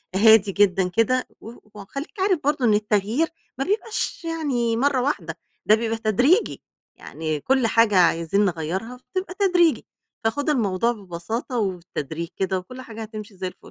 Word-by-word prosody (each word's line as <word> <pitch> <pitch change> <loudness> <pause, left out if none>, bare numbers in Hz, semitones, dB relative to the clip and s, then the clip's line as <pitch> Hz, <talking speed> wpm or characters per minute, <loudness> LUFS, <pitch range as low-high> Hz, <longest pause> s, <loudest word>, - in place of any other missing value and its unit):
هادي 215 -1 +6
جدًا 190 -2 +3
كده 240 +6 +1
و 225 - -9 0.2
وخلّيك 275 - -8
عارف 375 -3 +2
برضه 285 -3 +1
إن 215 - +4
التغيير 210 +8 +1 0.3
ما 270 - 0
بيبقاش 425 -3 -2
يعني 265 -9 -1
مَرّة 270 0 +2
واحدة، 180 - -2 0.3
ده 215 - +6
بيبقى 225 0 -2
تدريجي، 245 - +2 0.3
يعني 155 -2 -4
كلّ 260 - +2
حاجة 225 -3 +3
عايزين 170 +3 +3
نغيّرها 185 +8 -3 0.2
بتبقى 370 -1 -3
تدريجي. 355 -5 +3 0.4
فخُد 285 +7 0
الموضوع 230 -4 +1
ببساطة 215 +5 -5
وبالتدريج 170 -4 -4
كده، 190 0 -1
وكلّ 255 +8 -10
حاجة 225 -2 -9
هتمشي 215 -1 -8
زي 185 - -3
الفُل. 180 - -9
225 Hz, 150 wpm, -23 LUFS, 190-265 Hz, 0.4 s, هادي